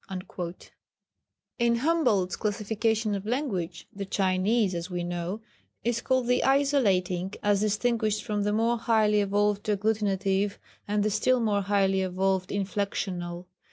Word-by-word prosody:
" - - -52
In 235 0 +3
Humboldt's 235 - +1
classification 215 +1 -1
of 195 -1 -3
language, 205 - -3
the 200 - -4
Chinese, 195 +2 +1
as 170 +1 -4
we 175 -1 -3
know, 175 +4 -4 0.4
is 235 0 0
called 260 -1 +1
the 250 +1 +2
isolating 200 -10 +2
as 205 -1 +2
distinguished 215 0 0
from 210 -1 -2
the 205 +1 +1
more 230 +2 +1
highly 215 -2 +3
evolved 205 0 +1
agglutinative, 200 -1 0 0.3
and 205 0 +1
the 215 - +1
still 255 +5 +2
more 210 -3 +1
highly 195 -1 +2
evolved 190 0 0
inflectional. 190 -3 -3
205 Hz, 130 wpm, -27 LUFS, 190-225 Hz, 0.4 s, In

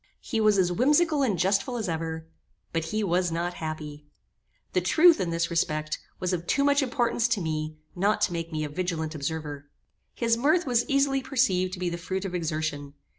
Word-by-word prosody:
He 225 -5 -2
was 215 -2 +4
as 180 -2 +3
whimsical 295 - +3
and 220 -9 +1
jestful 195 +7 +1
as 220 - -3
ever, 160 -1 -3 0.5
but 165 -1 -1
he 215 +6 -1
was 180 -2 +1
not 170 +2 -2
happy. 150 -2 -6 0.7
The 185 - +2
truth, 325 - +5
in 180 - -1
this 170 +1 -1
respect, 155 -2 -1 0.2
was 185 0 -1
of 170 -1 -3
too 280 - +2
much 285 +1 +4
importance 245 -3 +1
to 230 -3 0
me 155 -2 -3 0.2
not 200 +4 +2
to 180 - +2
make 165 0 -4
me 155 -1 -2
a 150 - -3
vigilant 160 -1 -3
observer. 145 -1 -5 0.5
His 230 -1 +1
mirth 310 +8 +2
was 240 -2 +1
easily 275 -1 +2
perceived 185 -9 +1
to 185 - -6
be 180 - -1
the 170 0 -3
fruit 190 +2 -3
of 185 - -4
exertion. 155 -4 -3
180 Hz, 195 wpm, -27 LUFS, 160-235 Hz, 0.7 s, truth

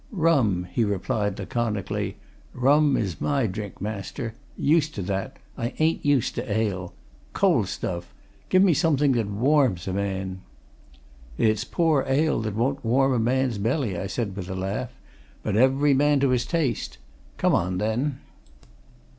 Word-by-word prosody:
"Rum," 140 - +2
he 115 - +1
replied, 100 0 -1
laconically. 105 -1 -2 0.4
"Rum 140 +2 +4
is 95 -6 -3
my 140 -4 +1
drink, 105 -1 -5
master. 105 +2 -5 0.2
Used 155 0 +2
to 100 - -3
that 95 +1 -3 0.2
I 120 +3 -3
ain't 160 +1 +1
used 145 -5 +2
to 120 -2 -4
ale. 100 -5 -1 0.4
Cold - - +3
stuff! 85 -1 -4 0.4
Give 185 +1 +5
me 185 -4 +5
something 150 -3 +2
that 115 -5 +1
warms 115 - +2
a 95 - -2
man." 95 -1 -3 1.0
"It's 110 0 +2
poor 155 +1 +1
ale 145 +2 +2
that 110 -2 -3
won't 135 +5 0
warm 135 +3 +3
a 125 - +1
man's 125 -1 +1
belly," 115 - 0
I 90 +3 -3
said 100 -1 -3
with 95 -2 -6
a 95 - -4
laugh. 100 +6 -3 0.5
"But 105 - -1
every 135 +5 +4
man 145 +1 +3
to 140 - +3
his 125 -1 +1
taste. 140 - -1 0.4
Come - - +2
on, 90 +2 +1
then." 125 +7 -1
115 Hz, 155 wpm, -25 LUFS, 100-140 Hz, 1.0 s, Give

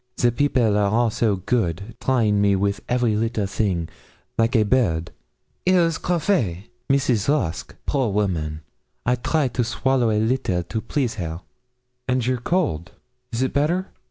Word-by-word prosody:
The 120 - +3
people 120 -5 +2
are 100 -1 +2
all 115 +2 +2
so 105 -2 +1
good, 100 0 -1
trying 110 -6 +2
me 100 -1 +4
with 100 +1 0
every 120 -3 +2
little 110 -1 0
thing, 95 -4 -1 0.5
like 115 +3 +1
a 110 - +5
bird; 95 -9 +1 0.5
here 185 0 +4
is 165 -1 +1
café 165 - 0 0.3
Mrs. 135 -5 +2
Rusk 95 - -1
a, - - -26
poor 135 -5 +1
woman, 80 -7 -1 0.4
I 125 - +3
try 135 +4 +1
to 120 +1 0
swallow 125 +1 +1
a 105 - +1
little 110 -6 0
to 90 +6 -4
please 125 -1 -1
her.' 80 +1 -4 0.7
'And 130 -2 +1
your 125 0 0
cold, 120 - -1 0.4
is 120 +2 0
it 130 - -1
better?' 170 +7 +1
115 Hz, 160 wpm, -23 LUFS, 100-130 Hz, 0.7 s, a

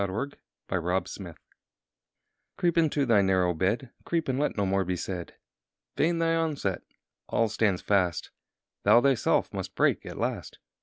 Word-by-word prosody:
Matthew 95 -1 -2
Arnold 140 +6 -4 0.3
The 95 -2 0
Last 90 +4 -2
Word 85 -4 -9 1.2
CREEP 175 -2 +1
into 155 -4 +2
thy 115 -5 +4
narrow 95 -2 +2
bed, 100 +9 -1
Creep, 165 -2 -1
and 130 +1 0
let 150 - 0
no 100 - +1
more 95 0 +1
be 90 0 -2
said! 90 -1 -5 0.6
Vain 170 +2 +2
thy 165 0 +2
onset! 150 - -1 0.5
all 115 - +2
stands 105 -3 0
fast. 95 -5 +1 0.5
Thou - - +6
thyself 135 -3 +2
must - - -5
break - - +2
at - - -7
last. - - -3
105 Hz, 160 wpm, -28 LUFS, 95-145 Hz, 1.2 s, Thou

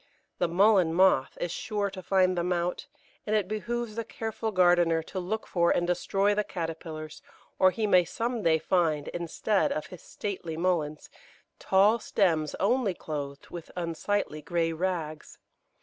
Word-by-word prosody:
The 175 - +2
Mullein 185 -1 +4
moth 185 -8 +3
is 175 - -2
sure 205 0 -2
to 190 -1 -8
find 185 0 +2
them 175 +1 -1
out, 175 +10 -1 0.4
and 215 - +1
it 205 -4 +1
behoves 235 +2 -3
the 230 +1 -3
careful 225 0 -4
gardener 175 -3 +3
to 185 - -6
look 210 +5 -3
for 170 -1 +1
and 175 - +2
destroy 195 +3 +1
the 210 +1 +1
caterpillars, 160 -4 -6 0.4
or 185 - +7
he 215 +3 -2
may 185 -3 +5
some 230 +6 -3
day 165 -4 +3
find, 160 -3 0
instead 175 +4 0
of 155 - -2
his 180 - -10
stately 180 -6 -5
Mulleins, 165 -4 -1 0.5
tall 205 +4 +4
stems 165 -8 +1
only 210 -1 +1
clothed 140 -3 -6
with 170 -2 -8
unsightly 170 -1 -2
grey 165 0 -1
rags. 160 -3 -3
180 Hz, 155 wpm, -28 LUFS, 165-205 Hz, 0.5 s, or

